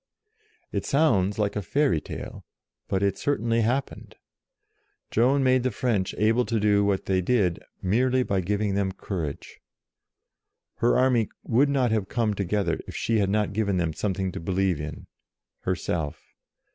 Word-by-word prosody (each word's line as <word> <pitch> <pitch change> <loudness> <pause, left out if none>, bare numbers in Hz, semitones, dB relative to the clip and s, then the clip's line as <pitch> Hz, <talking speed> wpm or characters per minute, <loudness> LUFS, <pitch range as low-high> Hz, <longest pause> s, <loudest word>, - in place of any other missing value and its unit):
It - - -2
sounds 105 -10 +2
like 105 -2 0
a 105 - -1
fairy 135 - +1
tale, - - -8 0.4
but 95 0 0
it 100 -1 0
certainly 115 -5 +1
happened. 125 +5 -2 1.0
Joan 130 +5 +3
made 130 -1 +4
the 130 - +1
French 105 -5 -1
able 110 +4 +3
to 115 -2 0
do 105 -1 +3
what 100 -1 0
they 95 -1 +1
did 90 -4 +1 0.2
merely 125 +7 +2
by 100 -5 0
giving 100 +2 -1
them 95 -1 0
courage. 85 -7 -5 1.2
Her 120 - +3
army 125 -4 +3
would 135 +5 +3
not 130 -4 +2
have 110 -4 0
come 115 -3 0
together 100 -3 -1
if - - -8
she 115 -1 +1
had 100 -2 +1
not 105 0 0
given 100 -3 0
them 85 -3 0
some 95 +3 -2
thing 95 -1 -2
to - - -6
believe 90 -2 0
in 75 0 -7 0.5
herself. 85 -4 -2
105 Hz, 160 wpm, -26 LUFS, 95-120 Hz, 1.2 s, made